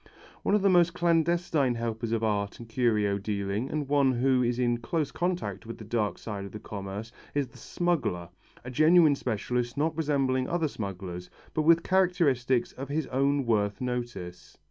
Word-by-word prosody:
One 205 - +2
of 210 - +1
the - - +5
most 175 -2 +4
clandestine 170 -5 +2
helpers 115 -1 -3
of 115 -1 0
art 100 -2 -1
and 115 - -9
curio 110 -4 +1
dealing 100 +3 -2
and 150 -2 -2
one 140 -2 +3
who 130 +1 +2
is 120 0 +1
in 120 -1 +1
close 145 +4 -2
contact 170 - -2
with 115 - -6
the - - -9
dark 105 -4 -1
side 105 -3 -6
of 100 - -8
the 110 - -6
commerce 100 +2 -6 0.2
is 140 -3 0
the - - -16
smuggler, 120 - -1 0.4
a 125 - -5
genuine 155 +3 +6
specialist 125 0 -2
not 155 +2 +1
resembling 135 -5 0
other 170 -2 +1
smugglers 95 -7 -6 0.2
but 155 - +1
with 165 +2 +5
characteristics 155 -10 +2
of 135 +1 -8
his 155 +1 -1
own 140 +1 +1
worth 105 -3 +1
notice. 120 -8 -5
125 Hz, 175 wpm, -28 LUFS, 110-155 Hz, 0.4 s, genuine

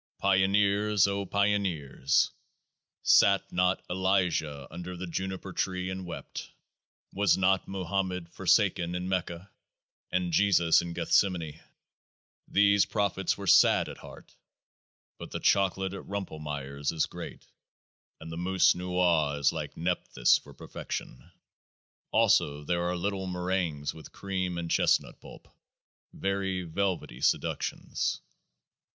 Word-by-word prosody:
" - - -69
Pioneers, 100 +1 +3
O 100 0 -2
Pioneers 90 -9 +1 0.4
!" - - -58 0.2
Sat 100 -1 +4
not 90 +1 +1
Elijah 90 -6 0
under 90 +2 -7
the 90 - -5
Juniper 95 +1 -5
tree, 95 0 -2
and 95 -1 -6
wept? 85 - -7 0.6
Was 100 -2 +3
not 95 0 +2
Mohammed 95 -1 -2
forsaken 85 +1 +2
in 90 +1 -3
Mecca, 90 0 -3 0.6
and 90 -2 -1
Jesus 85 -3 +4
in 85 0 -6
Gethsemane? 85 -4 0 0.9
These 100 0 +4
prophets 100 -3 0
were 100 - -7
sad 90 - +5
at - - -10
heart; - - -13 0.8
but - - -8
the - - -5
chocolate 95 -1 +1
at 100 - -8
Rumpelmayer's 75 -7 -4
is 80 -2 0
great, - - -9 0.7
and 80 0 -9
the 80 - -6
Mousse 95 +2 +3
Noix 90 -5 +1
is 70 - +2
like - - -6
Nepthys 85 -8 +2
for 70 -1 -16
per - - -12
fection. - - -7 0.8
Also 75 0 +2
there 85 +3 -1
are 90 - -2
little 95 +1 -2
meringues 90 -5 -2
with 80 - -12
cream 95 -3 -3
and 85 -1 -4
chestnut - - +1
pulp, - - -13 0.6
very 95 -1 -2
velvety 90 -6 -3
seductions. - - -1
90 Hz, 125 wpm, -29 LUFS, 85-95 Hz, 0.9 s, sad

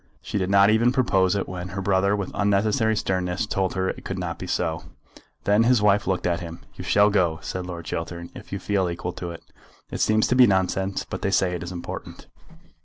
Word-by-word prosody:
She 105 - -3
did 95 -1 -1
not 100 +1 +6
even 115 +3 +4
propose 95 -8 +2
it 100 - -1
when 90 0 -5
her 95 +1 -5
brother 100 +1 +2
with 100 -2 -4
unnecessary 105 +2 +2
sternness 95 +1 -1
told 95 -3 -1
her 95 0 0
it - - -6
could 95 - -4
not 90 -2 -4
be 90 - -6
so. 80 -2 -2 0.6
Then 105 +2 +3
his 120 0 +4
wife 105 0 +3
looked 95 -1 0
at 85 -1 +1
him. 85 -1 -8
"You - - -8
shall 105 +1 +4
go," 85 -5 +2
said 90 -1 -4
Lord 85 -2 -7
Chiltern, 85 +1 -5
"if - - -12
you - - -2
feel 95 -3 0
equal 85 +1 -4
to 85 - -6
it. 85 -1 -9 0.5
It - - -3
seems 110 0 +3
to 125 - +2
be 125 -1 +7
nonsense, 95 0 0
but - - -5
they - - 0
say 95 -1 +2
that 90 - -3
it - - -7
is 90 - -6
important." 85 -1 -7
95 Hz, 230 wpm, -24 LUFS, 90-105 Hz, 0.6 s, be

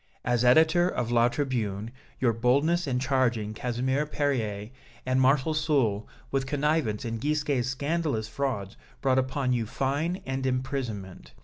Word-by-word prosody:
As 120 -1 +1
editor 160 +7 +5
of 120 -8 -2
'La 120 0 +4
Tribune,' 115 -6 -2 0.3
your 120 -3 +2
boldness 140 +9 +2
and 125 -2 0
charging 125 -5 0
Casimir 130 +5 -1
Perier 115 -8 -2 0.3
and 130 0 +2
Marshal 135 +3 +3
Soult 135 -9 +1 0.2
with 135 -1 0
connivance 145 -7 0
in 115 -1 -3
Gisquet's 145 -2 0
scandalous 140 -4 -1
frauds 115 -5 -3 0.2
brought 130 -1 +3
upon 130 0 0
you 115 -3 -1
fine 145 - -1
and 130 0 -3
imprisonment. 125 -7 -4
130 Hz, 135 wpm, -27 LUFS, 115-145 Hz, 0.3 s, editor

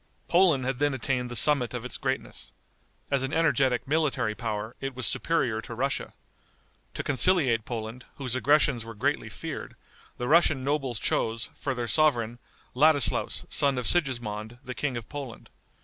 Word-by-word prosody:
Poland 170 -7 +3
had 130 -1 -1
then 145 0 +1
attained 125 -1 -1
the 120 - -5
summit 125 -2 +4
of 120 0 -5
its 125 - -6
greatness. 130 0 -4 0.6
As 140 -2 +2
an 135 +1 -2
energetic 140 -7 +2
military 145 -7 0
power, 110 -1 -4
it 135 -1 -4
was 130 -1 -2
superior 120 -9 0
to 115 - -8
Russia. 135 +4 -2 0.8
To - - -3
conciliate 135 - +3
Poland, 115 +1 -6
whose 130 -4 -3
aggressions 130 -2 +3
were 115 -1 -9
greatly - - -1
feared, - - -7 0.4
the 125 - -3
Russian 155 -3 +4
nobles 135 -4 -1
chose, 115 +1 -1
for 135 -2 -3
their 120 -1 -3
sovereign, 120 -6 +2 0.3
Ladislaus, 145 0 +2
son 140 -2 +2
of 125 - -2
Sigismond, 120 -8 +1
the 125 - -5
King 130 -2 -2
of 115 -1 -7
Poland. 140 -5 -8
130 Hz, 160 wpm, -27 LUFS, 120-145 Hz, 0.8 s, summit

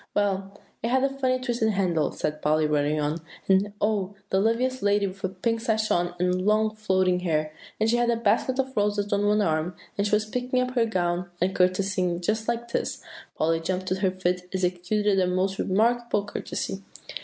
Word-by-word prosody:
"Well, 195 -1 -1 0.2
it 230 - -1
had 260 +2 +2
a 275 - +3
funny 265 -2 0
twisted 235 -4 0
handle," 175 -6 +1
said 150 0 -3
Polly, 155 +1 +2
hurrying 150 0 +1
on; 150 +2 -1 0.3
"and 195 +2 +3
oh! 205 -2 0 0.2
the 190 - +3
loveliest 245 +5 +1
lady 205 0 +2
with 195 0 -7
a 190 - 0
pink 225 +5 -1
sash, 220 -2 0
and 180 +1 +1
long, 215 +1 +2
floating 190 -4 +1
hair; 155 -3 -1 0.3
and 220 - +2
she 235 +2 +3
had 240 0 +2
a 235 - +3
basket 230 +3 +1
of 265 0 -1
roses 205 0 0
on 205 0 +2
one 210 0 +3
arm, 160 +1 0 0.2
and 200 - +2
she 210 - +3
was 210 0 0
picking 250 +3 -1
up 255 0 0
her 235 -3 +2
gown 175 -3 -1
and 185 +2 0
courtesying 185 -1 +1
just 215 +5 -1
like 235 0 -2
this." - - -2 0.3
Polly 165 +1 +1
jumped 185 +3 -2
to 185 - -1
her 190 -1 +2
feet, 180 -1 -1
and 180 - -23
executed 190 +3 +1
a 185 - +2
most 185 +2 0
remarkable 225 +1 +1
courtesy. 195 -1 -4
200 Hz, 200 wpm, -26 LUFS, 180-220 Hz, 0.3 s, a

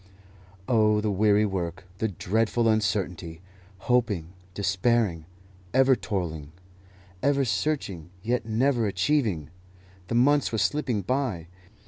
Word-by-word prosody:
Oh, 105 -3 +3
the 105 0 0
weary 105 +1 +3
work, 90 -2 -3 0.2
the 110 - +1
dreadful 110 +4 0
uncertainty! 95 -6 -1 0.5
Hoping, 110 -10 +1 0.3
despairing, 95 -3 +1 0.5
ever 130 0 +5
toiling, 80 -9 -4 0.7
ever 140 0 +2
searching, 100 - -2
yet 120 +1 0
never 115 +1 +1
achieving! 95 - 0 0.6
The 115 - -2
months 140 +4 +3
were 110 - -1
slipping 115 -1 0
by. 110 - -2
105 Hz, 105 wpm, -26 LUFS, 90-120 Hz, 0.7 s, ever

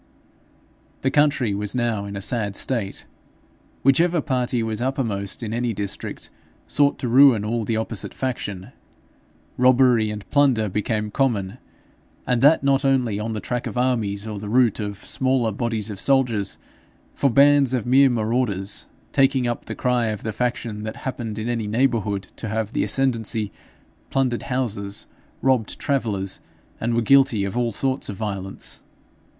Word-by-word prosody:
The 135 - +1
country 145 -7 +2
was 105 +3 -2
now 115 -4 0
in 100 0 -6
a 100 - -4
sad 105 -2 -1
state. 110 -6 -1 0.8
Whichever 165 +6 +4
party 125 -5 -1
was 110 0 -3
uppermost 115 -6 -2
in 110 -1 -3
any 120 0 -1
district, 100 -1 -5 0.3
sought 145 -1 +2
to 125 - -3
ruin 125 -3 +6
all 115 +2 -1
of 110 - -5
the 115 - 0
opposite 110 -1 -1
faction. 105 -8 -4 0.9
Robbery 125 -3 +4
and 105 -1 -6
plunder 130 -7 +3
became 105 +1 -2
common, 115 -5 0 0.7
and 125 -2 +1
that 145 +3 +5
not 135 0 +2
only 125 -6 +1
on 110 +1 -3
the 110 - -3
track 120 +3 -3
of - - -6
armies 110 -5 0
or 105 -2 -5
the 105 0 -6
route 120 -2 +3
of 100 -2 -5
smaller 130 -4 +1
bodies 110 -1 -2
of 100 - -7
soldiers, 125 -7 +2 0.6
for 140 - +1
bands 140 +1 +5
of 125 -5 -1
mere 135 +2 +5
marauders, 110 -4 0 0.2
taking 135 -2 +3
up 120 - -3
the - - -6
cry 125 -2 +1
of 105 -2 -4
the 110 - -2
faction 115 -2 -2
that 110 0 -5
happened 115 -5 -4
in 110 +1 -3
any 115 -3 -2
neighbourhood 110 -4 0
to 110 - -5
have 110 0 -2
the - - +1
ascendancy, 115 -5 0 0.6
plundered 130 -3 0
houses, 105 -6 -3 0.4
robbed 130 -5 +1
travellers, 105 -9 -1 0.4
and 115 +1 -1
were 120 - +2
guilty 130 -5 +4
of 100 +2 -3
all 120 -1 0
sorts 130 +5 -2
of 100 - -4
violence. 95 -2 -5
115 Hz, 160 wpm, -23 LUFS, 105-130 Hz, 0.9 s, ruin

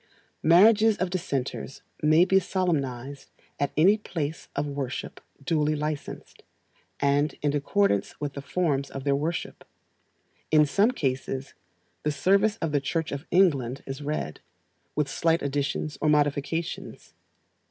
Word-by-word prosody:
Marriages 210 +6 +6
of 185 -1 -1
Dissenters 140 -7 -3 0.2
may 155 +3 +5
be 190 +1 +4
solemnized 140 -8 -2 0.3
at 145 - +1
any 195 +7 +5
place 160 -6 -4
of - - 0
worship 140 -3 -5 0.2
duly 155 0 +1
licensed, 150 -1 -5 0.6
and 140 +1 +2
in 145 0 +1
accordance 145 - +1
with 145 -1 -3
the 140 - -6
forms 140 -2 -1
of 135 - -7
their 140 0 +2
worship. 160 +4 -3 0.9
In 155 -1 +5
some 200 - +3
cases, 135 - -3 0.5
the 150 - 0
service 200 +7 +2
of 165 - 0
the 145 -1 +1
Church 160 +3 -2
of 140 +3 -6
England 140 -9 +2
is 135 +1 -6
read, 145 - -3 0.6
with 150 -2 +1
slight 165 +3 +1
additions 145 +1 -2
or 155 - +2
modifications. 150 +2 -1
150 Hz, 130 wpm, -26 LUFS, 140-170 Hz, 0.9 s, Marriages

